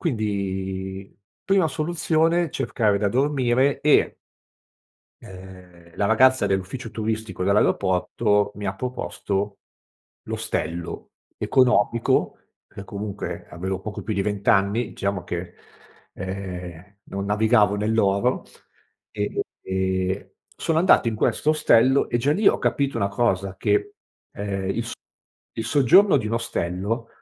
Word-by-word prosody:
Quindi 95 - -3 0.3
prima 195 -4 +3
soluzione, 165 +2 +1
cercare 105 -7 0
da 100 -1 +1
dormire 135 +1 +1
e 150 - +3 1.1
ehm, 90 -2 -13
la 100 - +1
ragazza 130 +4 +4
dell'ufficio 100 +5 -3
turistico 110 -3 -3
dell'aeroporto, 100 +2 +2
mi 105 -1 -6
ha 95 - -2
proposto 100 -4 -3 0.7
l'ostello, 85 +1 -4 0.3
economico 120 -3 +2 0.3
per 100 - -10
comunque 100 0 -6
avevo 95 +2 -4
poco 105 +1 -6
più 110 0 -3
di 100 - 0
vent'anni, 100 +2 +1
diciamo 100 -3 -3
che, 85 0 -5 0.6
ehm, 95 0 -7
non 100 0 -5
navigavo 105 0 +3
nell'oro, 105 +2 +1 0.7
e 105 -1 -2 0.3
e 95 0 -2 0.2
sono 160 -1 0
andato 170 -9 +4
in 110 - -2
questo 150 - +1
ostello 135 -4 +4
e - - 0
già 140 +5 +2
lì 205 +5 +4
ho - - +2
capito 140 -1 0
una 100 - +1
cosa 100 -3 0
che, 410 0 0 0.4
ehm, 100 -2 -4
il - - -2
so - - -6 0.7
il 115 - -2
soggiorno 145 - +5
di 110 - -4
un 115 - -1
ostello 115 +1 -2
105 Hz, 120 wpm, -23 LUFS, 95-125 Hz, 1.1 s, soggiorno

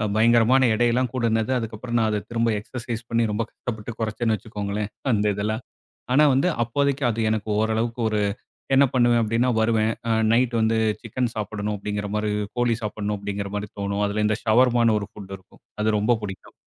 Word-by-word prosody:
பயங்கரமான 120 +3 +5
எடைலாம் 120 +2 +1
கூடுனது, 115 -2 0
அதுக்கப்புறம் 115 +1 -3
நான் 110 -1 +2
அத 105 -1 -1
திரும்ப 115 0 +1
எக்சர்சைஸ் 115 +1 -6
பண்ணி 115 0 +2
ரொம்ப 105 +2 0
கஷ்டப்பட்டு 110 -1 -6
குறச்சேன்னு 110 0 0
வச்சுக்கோங்களேன். 105 0 -4 0.2
அந்த 105 -1 +1
இதெல்லாம். 110 +3 -2 0.5
ஆனா, 150 +4 +6
வந்து 135 +7 +2 0.2
அப்போதைக்கு 140 +4 0
அது 115 0 -2
எனக்கு 110 -1 -2
ஓரளவுக்கு 110 +2 0
ஒரு 105 -1 0 0.5
என்ன 135 +1 +6
பண்ணுவேன் 120 -2 +4
அப்படின்னா, 115 +3 +1
வருவேன். 110 -1 +2 0.4
நைட் 125 +1 +2
வந்து 110 0 +2 0.2
சிக்கன் 120 +1 -2
சாப்பிடணும் 105 0 -3
அப்படிங்கிற 105 0 -4
மாரி 105 0 0 0.3
கோழி 120 -1 +2
சாப்பிடணும் 105 0 -3
அப்படிங்கிற 100 0 -4
மாரி 105 0 -4
தோணும். 100 +1 -1
அதில 105 +1 -1
இந்த 110 0 0
ஷவர்மான்னு 115 -1 +4
ஒரு 100 - -6
ஃபுட் 100 -3 -10
இருக்கும். 95 - -24 0.2
அது 110 0 +2
ரொம்ப 115 +4 +3
பிடிக்கும். 95 -2 -7
110 Hz, 165 wpm, -24 LUFS, 105-120 Hz, 0.5 s, ஆனா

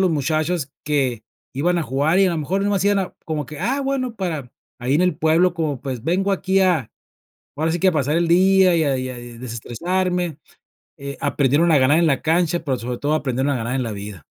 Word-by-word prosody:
los 185 -2 +3
muchachos 155 0 -1
que, 130 -7 0 0.3
iban 175 +6 +1
a - - 0
jugar 150 +5 +1
y 195 - +5
a - - +1
lo 170 - -2
mejor 185 +7 -1
nomás 200 -2 +1
iban 205 0 +3
a 185 - -5
como 155 -4 -3
que: 150 +3 -9
"Ah 260 +9 0
bueno, 265 -3 -2
para 160 - -4 0.3
ahí 125 +3 0
en 155 - +3
el 180 0 +1
pueblo 165 +3 +3
como 155 -6 -2
pues 130 -4 -5
vengo 185 +5 +1
aquí 195 0 +1
a 175 - +2 0.7
ahora 160 +2 0
sí 175 - -2
que 190 - +4
a - - +3
pasar 150 0 0
el 170 -1 +1
día, 185 +1 +5
y 160 - +2
a 135 -3 +1
y 130 0 -3
a 125 - -7
desestresarme". 130 - -3 0.6
Eh 140 0 -7
aprendieron 145 +5 +2
a 155 - +5
ganar 130 +4 +4
en 170 - +3
la 140 -3 +1
cancha, 170 +1 +1
pero 135 -4 -1
sobre 120 +1 -5
todo 145 +1 0
aprendieron 135 -1 -1
a - - 0
ganar 120 +2 -3
en 135 - 0
la 115 -2 -4
vida. 100 -5 -8
155 Hz, 230 wpm, -21 LUFS, 135-180 Hz, 0.7 s, y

